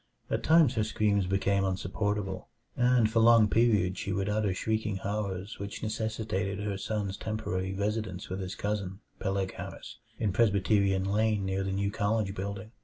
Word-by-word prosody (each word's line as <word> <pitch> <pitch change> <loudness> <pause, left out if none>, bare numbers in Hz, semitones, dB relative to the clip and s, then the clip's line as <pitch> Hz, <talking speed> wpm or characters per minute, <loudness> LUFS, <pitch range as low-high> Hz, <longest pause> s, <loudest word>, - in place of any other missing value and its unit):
At - - 0
times 160 -5 +5
her 110 -4 +1
screams 105 -3 +1
became 100 +1 +1
insupportable, 95 +1 -2 0.3
and 125 -2 +4
for 110 +1 +1
long 115 -1 +7
periods 105 -5 +2
she 100 - -3
would 95 +1 -1
utter 105 -1 +1
shrieking 110 +2 -1
horrors 100 -1 -4
which 100 0 -6
necessitated 110 -3 -2
her 105 0 -2
son's 100 -1 -3
temporary 95 -4 -3
residence 105 -2 -2
with 95 +1 -4
his 95 0 -4
cousin, 100 -1 -3 0.2
Peleg 95 -1 -1
Harris, - - -8 0.2
in 105 -4 0
Presbyterian 100 -2 +3
Lane 105 +1 +1
near 95 0 -1
the 95 - -2
new 100 +1 0
college 105 -1 0
building. 100 +2 -5
100 Hz, 160 wpm, -29 LUFS, 95-110 Hz, 0.3 s, long